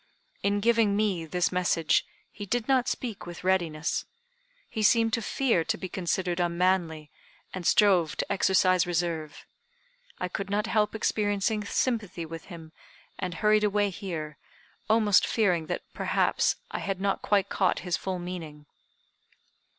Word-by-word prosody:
In 205 0 +1
giving 225 -2 +3
me 200 -6 0
this 180 +1 0
message, 175 -3 +1 0.2
he 205 -2 -8
did 235 +3 -1
not 260 -2 +3
speak 225 -8 -4
with 175 0 -8
readiness. 170 -5 0 0.6
He 220 - -4
seemed 225 +1 +4
to 230 - +1
fear 230 -7 +1
to 225 - -1
be 185 - -5
considered 180 -1 -2
unmanly, 170 -3 0 0.4
and 180 -2 -3
strove 185 -7 +4
to - - -2
exercise 185 -2 +3
reserve. 165 -3 -3 0.7
I 180 - -2
could 195 +2 -5
not 205 +1 0
help 210 -1 +1
experiencing 210 -1 0
sympathy 205 -7 -1
with 165 0 -8
him, 165 -4 -11 0.5
and 180 -2 -3
hurried 215 +3 +3
away 205 -1 +2
here, 160 -6 -6 0.5
almost 215 -3 +4
fearing 180 -8 +1
that, - - -3
perhaps, - - +1 0.2
I - - -3
had 195 -2 -3
not 195 0 0
quite 200 -2 +1
caught 190 -2 +1
his 175 -2 +1
full 185 +2 -3
meaning." 165 -4 -7
190 Hz, 145 wpm, -27 LUFS, 170-210 Hz, 0.7 s, seemed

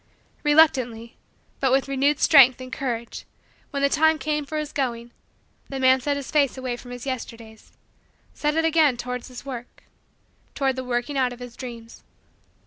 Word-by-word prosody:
Reluctantly, 255 -7 +2 0.4
but 265 -2 +1
with 270 +1 +2
renewed 275 +2 +1
strength 265 -4 +6
and 255 0 -9
courage, 235 -3 -4 0.5
when 280 -1 -3
the - - +5
time 315 +2 +3
came 300 -1 -2
for 310 - -4
his 300 -1 -3
going, 240 -4 -3 0.6
the 270 - -4
man 260 0 +4
set 285 +2 -1
his 280 - -7
face 280 -4 +2
away 255 -2 -3
from 245 +1 -12
his 245 0 -8
Yesterdays 230 -4 -7 0.6
set 300 0 -1
it 325 0 +2
again 315 -5 +3
toward 250 0 -5
his 255 +1 -10
work 245 -3 -8 0.7
toward 270 -2 0
the 260 - -4
working 250 +3 -2
out 255 -1 +1
of 245 - -13
his 245 -1 -9
dreams. 235 -3 -9
260 Hz, 170 wpm, -24 LUFS, 245-285 Hz, 0.7 s, strength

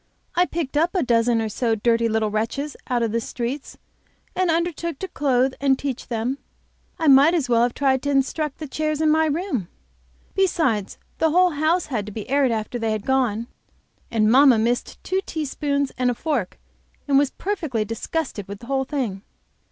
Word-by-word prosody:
I 360 +1 +3
picked 305 -4 -3
up 335 +5 +1
a 365 - +2
dozen 230 -1 +2
or - - -1
so 230 +2 0
of 215 - -4
dirty 230 -1 +3
little 220 -1 0
wretches 235 +7 -2
out 245 -2 +1
of 225 - 0
the 230 +1 0
streets, 250 +5 -5 0.6
and 370 -1 +1
undertook 335 -1 -1
to 380 - -5
clothe 265 -5 +1
and 270 -1 +3
teach 270 -3 -4
them. 240 +4 -2 0.6
I 320 - 0
might 285 +5 +7
as 300 -7 0
well 235 -1 +4
have 240 0 +1
tried 265 -2 +2
to 285 - -2
instruct 280 +2 0
the 310 - -6
chairs 305 +2 -2
in 315 -1 +3
my 315 +1 +3
room. 295 - -2 0.7
Besides 320 - +1 0.2
the 320 - +3
whole 360 +3 +4
house 315 +4 +1
had 215 -7 -3
to - - -6
be 210 0 -6
aired 280 -2 +3
after 225 +2 -3
they 225 -1 0
had 215 -2 -4
gone, 245 -4 +1 0.6
and 220 -2 +2
mamma 265 -1 +7
missed 235 +3 -1
two 375 - 0
teaspoons 285 -2 -1
and 250 -1 +2
a 245 - 0
fork 260 - -2 0.5
and 275 -1 +5
was 285 -1 +2
perfectly 315 - -2
disgusted 225 - -4
with 200 0 -7
the - - -10
whole 265 +1 0
thing. 250 -9 -3
265 Hz, 190 wpm, -23 LUFS, 230-310 Hz, 0.7 s, might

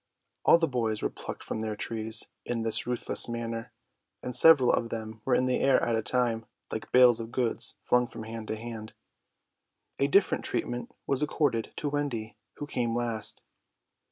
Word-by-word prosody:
All - - +8
the 165 -1 +1
boys 115 -5 -1
were - - 0
plucked - - -8
from - - -4
their 110 -1 -3
trees 110 0 -1 0.2
in 115 -2 -2
this 115 +1 +1
ruthless 125 0 +2
manner; 115 -1 -4 0.5
and 125 - -3
several 135 -2 +7
of 115 - 0
them 110 -1 -6
were 130 - +3
in 130 - +2
the 130 0 +1
air 135 -1 +4
at 115 - +1
a 110 - +1
time, 115 -1 0 0.2
like 110 - -5
bales 125 -2 +6
of 115 0 -6
goods 120 -2 -1
flung 125 0 +3
from 110 - -8
hand 110 0 -7
to 110 - -2
hand. 110 -1 -8 1.1
A 140 - +3
different 195 +7 +3
treatment 120 0 -3
was 135 0 +1
accorded 145 -6 0
to 145 - -2
Wendy, 140 -7 -3 0.2
who 145 - -6
came 120 -5 -1
last. 115 -3 -2
120 Hz, 180 wpm, -28 LUFS, 110-125 Hz, 1.1 s, All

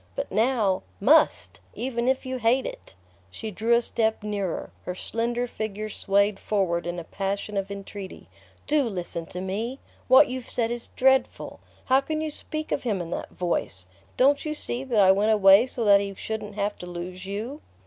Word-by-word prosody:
But - - -4
now 220 -5 +2 0.2
MUST, 295 +9 +3 0.2
even 240 -1 -2
if 265 +1 +1
you 260 0 -3
hate 245 +3 +2
it!" - - -8 0.3
She 215 - -6
drew 225 +4 +2
a 235 - +2
step 220 -2 0
nearer, 200 -4 -3
her 180 - -5
slender 235 +5 -2
figure 215 -2 -5
swayed 200 0 +1
forward 175 -5 0
in 175 0 -3
a 170 - -5
passion 200 +4 -3
of 195 0 -1
entreaty. 200 -1 -8 0.4
"Do 295 -2 +2
listen 175 -4 -4
to 180 - -7
me! 210 +7 -3 0.3
What 260 +3 +7
you've 255 -1 -6
said 230 -1 0
is 240 0 -5
dreadful. 265 0 +2 0.3
How 265 +1 +4
can 310 +2 -3
you 310 -1 -2
speak 310 +1 -5
of - - 0
him 215 -6 -1
in 170 -1 -5
that - - -4
voice? 135 - -2 0.3
Don't 280 +3 +4
you 305 -1 -3
see 255 -3 -3
that 240 -5 +1
I 190 -1 +7
went 210 +3 +3
away 200 +3 +7
so 240 -3 -3
that 200 -1 +6
he 200 -1 -5
shouldn't 215 0 -5
have 205 0 -2
to 180 - -7
lose 180 +2 -7
you?" 225 +10 -5
215 Hz, 190 wpm, -26 LUFS, 195-250 Hz, 0.4 s, What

